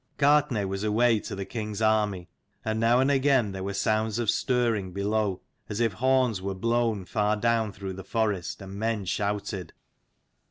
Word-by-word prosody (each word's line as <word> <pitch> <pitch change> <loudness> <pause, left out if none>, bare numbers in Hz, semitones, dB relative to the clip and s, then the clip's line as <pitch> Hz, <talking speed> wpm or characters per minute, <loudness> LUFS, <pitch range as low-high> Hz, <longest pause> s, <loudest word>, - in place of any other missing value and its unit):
Gartnaidh 140 -8 +3
was 95 +1 -3
away 110 +1 +3
to - - -6
the 100 0 -4
king's 105 -2 -5
army: 105 -5 +1 0.4
and 110 0 -1
now 115 +2 +4
and 135 +2 +3
again 135 -6 +3
there 95 -1 -5
were 100 0 -3
sounds 110 +1 0
of 115 -3 +2
stirring 115 -7 0
below, 100 -1 -1 0.3
as 105 - -3
if 115 -3 +2
horns 130 -2 +2
were 95 0 -3
blown 115 -1 0
far 105 +2 0
down 115 -1 +1
through 95 -1 -6
the 95 +1 -8
forest, 105 -5 -2
and 95 0 -9
men 110 -2 -1
shouted. 100 -2 -2
110 Hz, 170 wpm, -27 LUFS, 100-115 Hz, 0.4 s, now